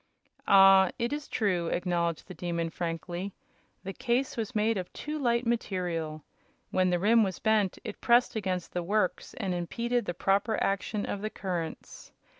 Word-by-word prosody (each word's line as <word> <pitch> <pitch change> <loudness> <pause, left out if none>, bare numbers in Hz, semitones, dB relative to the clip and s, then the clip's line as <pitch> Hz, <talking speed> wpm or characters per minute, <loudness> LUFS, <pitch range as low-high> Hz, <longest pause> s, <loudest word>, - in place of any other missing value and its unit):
"Ah, 195 -1 +7
it 235 +4 -1
is 295 -1 -4
true," 185 -7 0
acknowledged 170 -2 -1
the 185 - -8
Demon, 170 -2 -3
frankly. 175 +3 -4 0.5
"The 195 - -5
case 250 +3 0
was 225 +1 -4
made 220 +1 +2
of 185 -3 -4
too 300 +1 -5
light 240 -2 +1
material. 175 -9 -2 0.5
When 185 -1 +2
the 175 - +2
rim 220 +6 +4
was 190 -3 -2
bent 215 -4 +1
it 215 -3 -7
pressed 240 0 +4
against 185 -5 -2
the 180 - -1
works 200 +2 -1
and 185 - -2
impeded 235 +7 -1
the 175 - -3
proper 200 +5 +1
action 200 +1 -1
of 200 - -4
the 215 - -2
currents. 175 -6 -5
195 Hz, 165 wpm, -29 LUFS, 175-225 Hz, 0.5 s, Ah